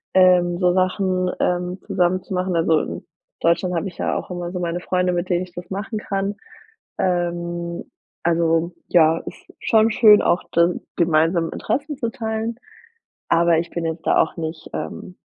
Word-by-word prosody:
ähm, 180 -2 +5
so 180 -1 +3
Sachen, 185 0 +1
ähm, 180 +1 -1
zusammen 180 +1 +1
zu - - -7
machen. 185 0 -1
Also, 165 -1 +3
in - - -7 0.3
Deutschland 175 +2 +1
habe 170 +3 -1
ich 180 - -10
ja - - -1
auch - - -4
immer 175 -1 -4
so 180 - -4
meine 175 0 -2
Freunde, 180 0 0
mit 175 +1 -2
denen 175 0 +1
ich 180 -1 -12
das 175 0 -9
machen 210 +3 -4
kann. 200 0 -2 0.6
Ähm, 175 -1 -2 0.4
also, 165 0 +1 0.2
ja, 165 -1 +4
ist - - -11
schon 225 0 +3
schön 215 -2 +7
auch 175 - +1
dann 170 +1 +2 0.2
gemeinsam 165 0 +2
Interessen 295 +2 -2
zu 235 -4 -2
teilen, 220 0 -3 0.7
aber 170 -1 +4
ich 170 - -3
bin 170 -1 -3
jetzt 160 0 -5
da - - +4
auch 160 - -4
nicht, 160 -1 -5
ähm 180 - -6
175 Hz, 175 wpm, -21 LUFS, 170-185 Hz, 0.7 s, schön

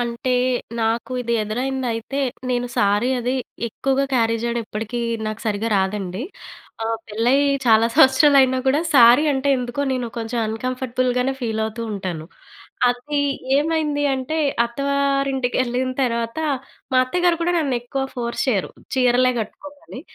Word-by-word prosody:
అంటే 240 +1 -2 0.5
నాకు 230 +3 -1
ఇది 235 -1 -2
ఎదురైందయితే 250 +3 -2 0.3
నేను 245 0 0
సారీ 205 +4 +2
అది 250 +2 -1 0.3
ఎక్కువగా 270 +4 0
క్యారీ 230 -2 +2
జేయడం 235 0 -1
ఇప్పడికీ 220 +3 -4 0.3
నాకు 215 0 -4
సరిగ్గా 215 +2 -1
రాదండి. 190 +1 -2 0.6
ఆ! - - -1 0.2
పెళ్ళై 230 +5 +2 0.3
చాలా 225 0 +5
సంవత్సరాలైనా 265 -2 +5
కూడా 280 +4 +3
సారీ 245 +3 +7
అంటే 270 +1 -1
ఎందుకో 245 +2 -4
నేను 250 -2 -2
కొంచెం 230 +1 -3
అన్‌కంఫర్టబుల్‍గానే 255 +2 -1
ఫీలవుతుంటాను. 220 -7 -3 0.6
అది 285 +4 -1 0.4
ఏమైంది 300 -1 0
అంటే 265 +4 -3 0.3
అత్తవారింటికెళ్ళిన 265 -1 0
తర్వాత 235 +2 -1 0.5
మా 255 - +3
అత్తగారు 350 +5 +1
కూడా 350 +1 +1
నన్ను 280 -5 0
ఎక్కువ 270 +2 -3
ఫోర్స్ 235 -1 -3
చేయరు, 200 -7 0 0.2
"చీరలే 255 0 +3
కట్టుకోమని". 290 +4 -9
250 Hz, 120 wpm, -21 LUFS, 230-270 Hz, 0.6 s, సారీ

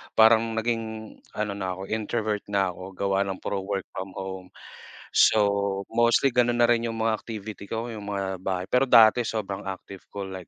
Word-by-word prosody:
Parang 115 0 +5
naging 110 -1 -3 0.2
ano 105 -1 -1
na 95 -2 -3
'ko 95 - -8
introvert 110 -1 -1
na 100 -2 +1
'ko. 95 +1 -10
Gawa 100 0 0
ng 95 - -2
puro 100 -1 -2
work 95 -1 -2
from 95 0 -6
home. 95 -1 -6 0.7
So, 100 -2 +3
mostly 120 +3 +3
ganun 120 0 +2
na - - +5
rin 120 0 +2
yung 115 - -4
mga 110 -1 +1
activity 110 -2 -8
ko. 115 +1 -3
Yung 105 -2 -8
mga 95 -2 -3
bahay. 90 -1 -2
Pero 125 +2 +4
dati 115 0 +7
sobrang 100 -3 -4
active 95 0 -8
ko 100 -1 -5
like 95 -2 -8
105 Hz, 185 wpm, -26 LUFS, 95-115 Hz, 0.7 s, dati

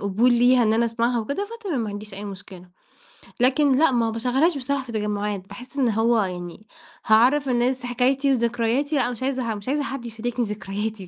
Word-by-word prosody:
قبول 210 +5 +2
ليها 245 +1 +4
إن 220 -1 +2
أنا 230 +1 +2
أسمعها، 235 +1 0
وكده 285 - -3
فتمام 345 - -2
ما 220 - -3
عنديش 205 0 -8
أي 200 +2 -7
مشكلة. 185 -2 -10 0.7
لكن 265 +2 +3
لأ 320 -2 +4
ما 235 -2 +1
باشغلهاش 260 +8 +1
بصراحة 275 +1 -2
في 245 - -9
تجمعات، 210 -2 -3
باحس 250 +7 -11
إن 260 -4 +2
هو 225 +1 +2
يعني 180 +3 -7 0.4
هاعرَّف 255 +6 +4
الناس 250 +1 0
حكايتي 265 +3 +1
وذكرياتي، 240 +4 0
لأ 250 -3 +1
مش 245 +1 -7
عايزة 265 -1 -1
ح - - 0
مش 205 +1 -10
عايزة 290 +2 0
حد 270 -3 -5
يشاركني 235 +1 -3
ذكرياتي 205 0 -5
235 Hz, 190 wpm, -23 LUFS, 215-260 Hz, 0.7 s, ليها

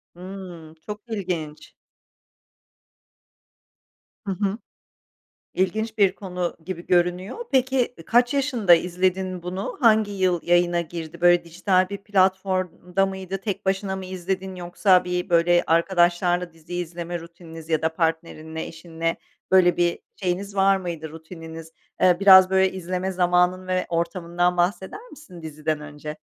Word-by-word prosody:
Hımm. 180 -3 -9
Çok 210 +6 -8
ilginç. 175 -8 -5 2.5
Hı 195 - -2
hı. 195 +2 -1 1.0
İlginç 220 +4 -1
bir 195 -2 +3
konu 180 -3 -4
gibi 175 -1 -6
görünüyor. 180 - +1
Peki, 260 -2 +1
ı - - -17
kaç 245 +3 +3
yaşında 255 -10 +3
izledin 180 +1 0
bunu, 185 +3 -5
hangi 220 -3 +4
yıl 185 -3 +1
yayına 175 0 +2
girdi, 165 0 -8
böyle, 175 0 +5
dijital 185 +2 +1
bir 200 - -4
platformda 190 -2 0
mıydı, 190 0 -5
tek 195 0 -5
başına 190 0 -1
mı 190 - -6
izledin 185 +1 -4
yoksa 180 +1 +2
bir, 180 +1 -3
böyle, 175 0 +4
arkadaşlarla 175 +1 +2
dizi 165 +2 -12
izleme 175 0 -4
rutininiz 165 -1 -12
ya 160 -2 +1
da 160 0 0
partnerinle, 160 -1 -3
eşinle, 165 0 -4 0.3
böyle, 180 -2 +5
bir 175 -1 +1 0.2
şeyiniz 195 +2 -3
var 195 0 +4
mıydı 170 -4 -5
rutininiz? 160 0 -10 0.3
Eee, 180 -1 +5
biraz, 190 -2 +8
böyle, 190 0 +3
izleme 185 +1 -3
zamanın 180 0 +2
ve 185 0 0
ortamından 170 +1 -1
bahseder 190 - -1
misin 280 - -13
diziden 155 -1 -3
önce? 150 +1 -8
180 Hz, 130 wpm, -23 LUFS, 170-190 Hz, 2.5 s, biraz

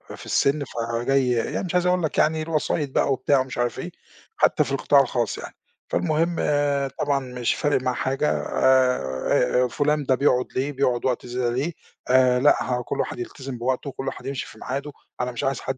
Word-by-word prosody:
في - - -12
السن 140 +1 +1
فجاي 120 +2 0
يعني 120 +9 -1
مش 180 - -5
عايز 180 0 +2
أقول 180 -1 +2
لك 155 - -2
يعني 155 +1 +3
الوسايط 155 -2 -1
بقى 140 - +1
وبتاع 140 +1 +2
ومش 130 0 -4
عارف 120 -1 -1
إيه، 180 - -5 0.5
حتى - - +3
في - - -6
القطاع - - +4
الخاص - - -1
يعني. - - -9 0.3
فالمهم 165 +1 0 0.6
طبعًا 140 -1 +1
مش 125 -2 -2
فارق 145 -3 +1
معاه 130 -1 0
حاجة 135 +3 0
آآ 125 - +2
آآ 125 - +2
فلان 150 +3 0
ده 130 -1 +3
بيقعد 125 -2 +2
ليه 135 +3 0
بيقعد 130 -3 0
وقت 125 -1 0
زيادة 125 0 -1
ليه 145 +7 -1 0.4
آآ، 125 -1 +5
لأ، 145 +3 +5
ه 125 -1 -1
كل - - -4
واحد - - -2
يلتزم 130 +1 -6
بوقته 130 +3 -2
وكل 135 0 -6
واحد - - -5
يمشي 135 -1 -3
في - - -14
معاده، 140 +3 -4 0.3
أنا 125 0 -1
مش 120 - -5
عايز 135 0 0
حد 130 - -3
130 Hz, 200 wpm, -24 LUFS, 125-145 Hz, 0.6 s, آآ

